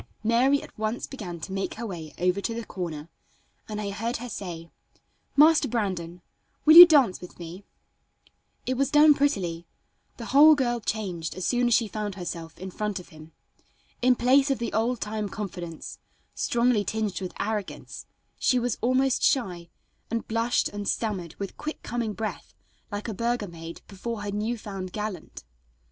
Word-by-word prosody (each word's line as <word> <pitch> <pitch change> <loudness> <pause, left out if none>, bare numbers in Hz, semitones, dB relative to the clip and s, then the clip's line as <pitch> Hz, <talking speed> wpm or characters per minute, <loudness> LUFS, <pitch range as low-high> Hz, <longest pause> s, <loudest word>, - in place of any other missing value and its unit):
Mary 250 +5 +3
at - - -13
once 220 +2 -2
began 180 -10 -7
to 175 - -7
make 195 0 -3
her 235 - -5
way 165 -7 -6
over 180 +2 +1
to 230 +2 -3
the 235 -1 -5
corner, 165 -6 -5 0.6
and 210 -1 -4
I 205 -1 -3
heard 230 +4 -2
her 245 +1 -7
say: 170 -6 -7 0.6
"Master 310 +2 +6
Brandon, 180 -6 -3 0.4
will 310 +1 +8
you 350 +1 +14
dance 275 - +4
with 180 - -11
me?" 175 +3 -9 1.0
It 255 0 -1
was 275 0 +1
done 300 0 +7
prettily. 190 -13 -1 0.5
The 230 - -7
whole 305 +2 +9
girl 240 -4 0
changed 190 -7 -3
as 185 - -4
soon 245 -1 +2
as 240 - +4
she 230 - +2
found 210 -2 -4
herself 170 -3 -6
in 190 +1 -7
front 210 0 -3
of 180 - -13
him. 155 0 -14 0.7
In 250 +1 +5
place 270 +4 +4
of 270 - +1
the 235 - -4
old 230 +3 +1
time 210 -1 -3
confidence, 180 -6 -7 0.3
strongly 235 -3 +1
tinged 210 -4 -2
with 185 - -6
arrogance, 210 -2 -4 0.3
she 255 - +3
was 245 -1 -1
almost 255 +1 +2
shy, 180 - +1 0.4
and 230 0 -3
blushed 230 +2 +1
and 205 -1 -6
stammered 190 -7 -2
with 200 -1 -6
quick 310 - -6
coming 235 -3 -2
breath, 215 +1 -6 0.4
like 205 +2 -4
a 220 - -3
burgher 235 0 -1
maid 165 -1 -9
before 210 +2 -5
her 205 - -3
new 215 +4 -2
found 195 -4 -7
gallant. 210 -5 -6
215 Hz, 170 wpm, -26 LUFS, 185-240 Hz, 1.0 s, you